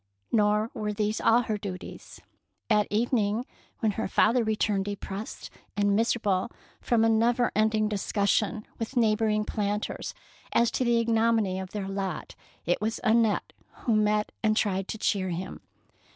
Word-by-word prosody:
Nor 210 0 +2
were 210 -1 -2
these 210 +1 -1
all 235 +2 +5
her 215 -2 -2
duties. 190 -3 -8 0.5
At 210 -1 +4
evening, 220 0 +1 0.4
when 220 -2 +2
her - - -3
father 235 +5 +3
re 220 -1 0
turned 200 -2 0
depressed 205 +1 -6 0.3
and 205 -1 +3
miserable 220 -2 +1 0.3
from 225 -2 +2
a - - +4
never 235 +2 +2
ending 215 0 +2
discussion 210 +1 0
with 230 +3 -4
neighbour 220 -1 +3
ing 210 0 +1
planters 210 -1 -3 0.4
as 235 -1 +3
to - - 0
the 235 -1 +3
ignominy 225 -4 +2
of 190 -1 -6
their 200 -1 -4
lot, 195 -4 -4 0.3
it 175 +4 +1
was 220 +1 -1
Annette 225 -2 +2 0.3
who 230 - +2
met 210 0 +2
and 215 -1 +2
tried 195 -2 0
to - - -4
cheer 195 -3 0
him. 180 +2 -5
215 Hz, 155 wpm, -27 LUFS, 205-225 Hz, 0.5 s, all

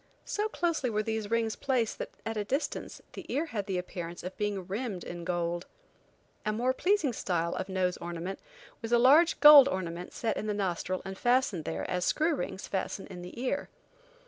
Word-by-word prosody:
So 420 +1 -1
closely 335 - 0
were 215 -1 0
these 220 -1 -2
rings 230 -1 +1
placed 250 -5 0
that, - - -4 0.2
at 225 - -3
a 210 - -1
distance, 275 +9 -3
the - - -7
ear 295 +5 0
had 215 - -4
the 190 -2 -1
appearance 175 -1 -6
of 180 +1 -6
being 205 -3 -2
rimmed 200 -1 -4
in 175 0 -7
gold. 175 0 -2 0.8
A 215 - 0
more 245 +4 +1
pleasing 355 -4 +1
style 170 -5 -1
of 190 +1 -4
nose 185 -1 0
ornament 175 +2 -5 0.4
was 225 - -5
a 240 - +6
large 290 +8 +6
gold 295 -2 +11
ornament 180 -4 -4
set 225 -2 -2
in 215 - -3
the 210 - 0
nostril 185 -1 -2
and 190 0 -6
fastened 240 -9 +2
there - - -3
as 180 0 -1
screw 315 - +2
rings 210 -8 -4
fasten 195 0 -3
in 180 -1 -8
the 180 +6 -9
ear. 265 +3 -2
210 Hz, 195 wpm, -30 LUFS, 180-255 Hz, 0.8 s, gold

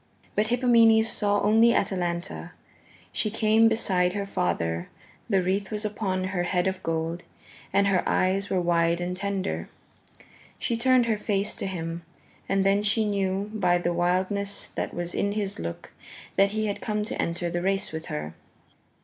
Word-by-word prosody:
But 210 +1 +1
Hippomenes 230 -2 +5
saw 205 -2 +1
only 225 +3 +5
Atalanta. 175 -2 -2 0.6
She 215 - 0
came 220 +1 +4
beside 185 -5 +1
her 200 0 -2
father; 85 - -1 0.4
the 195 -4 +3
wreath 190 +2 -1
was 215 0 -3
upon 195 -3 -2
her 185 -1 -1
head 180 0 0
of 190 0 -1
gold, 165 +1 -2 0.5
and 200 - +3
her 195 -2 +3
eyes 195 +2 +1
were 190 - +1
wide 170 -1 +2
and 175 +1 -3
tender. 190 - -3 0.9
She 235 - -1
turned 255 +1 +4
her 220 -2 0
face 205 -1 -1
to - - -3
him, 165 -2 -4 0.5
and 195 0 +2
then 200 +1 +3
she 210 +1 +2
knew 200 0 -1
by 180 -5 +2
the 175 0 -1
wildness 185 +3 0
that - - -4
was 175 0 -4
in 200 0 0
his 205 -2 -3
look 85 0 -6 0.4
that 195 0 +4
he 215 +1 -1
had 205 -1 -3
come 210 -2 -1
to - - -3
enter 170 0 -2
the 175 0 -1
race 195 +2 0
with 160 0 -6
her. 75 +1 -4
195 Hz, 165 wpm, -26 LUFS, 175-210 Hz, 0.9 s, Hippomenes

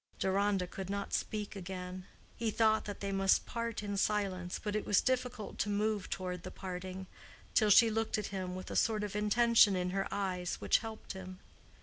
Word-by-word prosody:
Deronda 195 0 +1
could 190 +1 -7
not 200 0 -3
speak 210 -1 -2
again. 185 -1 -6 0.3
He 230 -1 -1
thought 220 0 +3
that 205 -1 -6
they 200 0 -2
must 195 0 +3
part 230 -2 -3
in 205 -1 -3
silence, 195 -4 0
but 210 -1 -3
it 215 - 0
was 205 - +4
difficult 250 -4 -2
to 205 - 0
move 210 -1 0
toward 180 -2 -3
the - - -7
parting, 185 0 -6 0.5
till 215 - +4
she 225 +2 +7
looked 225 0 0
at 210 - -2
him 185 -1 -3
with 185 - -7
a - - -4
sort 215 -2 +2
of 205 -1 -4
intention 210 0 +5
in 180 0 -1
her 195 +1 -1
eyes, 185 -3 -2
which - - +3
helped 220 -1 -7
him. 185 -1 -8
200 Hz, 195 wpm, -33 LUFS, 185-215 Hz, 0.5 s, she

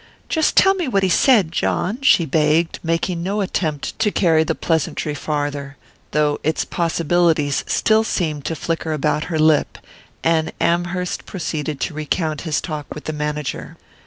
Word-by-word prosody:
"Tell 335 +4 +4
me 370 -3 -2
just 255 - -5
what 195 -1 +3
he 190 - +2
said, 200 - +4
John," 195 +6 -1
she 185 -11 +5
begged, 155 +3 +1
making 170 +1 -1
no 195 +4 -2
attempt 160 -7 -2
to 215 - +3
carry 165 -6 +3
the - - -1
pleasantry 160 -2 -1
farther, 145 -1 -3 0.3
though 150 -1 +1
its 155 +1 0
possibilities 165 -3 +1
still 220 0 +3
seemed 155 -9 -2
to 165 - -2
flicker 165 0 -2
about 150 +1 0
her 165 -2 -2
lip; 155 -1 +3 0.5
and 160 -1 +1
Amherst 175 +1 -1
proceeded 155 -5 -4
to - - -2
recount 155 0 -2
his 160 -3 -1
talk 155 -4 -6
with 150 - -8
the 155 - -4
manager. 150 -1 -4
160 Hz, 160 wpm, -20 LUFS, 150-175 Hz, 0.5 s, she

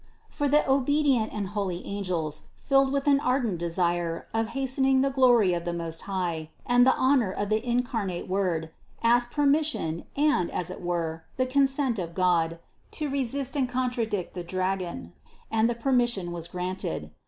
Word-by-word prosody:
For 290 - -1
the 300 +2 +3
obedient 270 -3 +2
and 200 -3 -4
holy 195 -4 -3
angels, 180 -7 -3
filled 270 -1 +2
with 275 0 -1
an 280 -1 +4
ardent 250 - 0
desire 170 -1 -1
of 225 0 0
hastening 265 0 +2
the 275 0 +1
glory 245 -8 +4
of 170 -1 -2
the 175 - -3
Most 165 -1 -4
High 170 -5 -2 0.2
and 245 +1 +4
the 260 - +5
honor 255 -7 +3
of 205 +1 -3
the 215 +1 +1
incarnate 235 -7 -1
Word, 180 -4 -1 0.3
asked 240 +1 +4
permission 290 - +1
and, 295 - +2
as 180 0 -3
it - - -8
were, 165 -2 -3
the 255 - +2
consent 270 -3 +1
of 170 -2 -5
God, 170 -3 +2 0.4
to 300 -2 -2
resist 275 +1 -1
and 265 -3 +1
contradict 245 -6 -2
the 175 - -5
dragon, 185 - -3 0.4
and 225 +1 +3
the 240 - -1
per 250 +4 -2
mission 235 -8 +1
was 170 -1 -5
granted. 180 - -4
215 Hz, 165 wpm, -27 LUFS, 175-265 Hz, 0.4 s, the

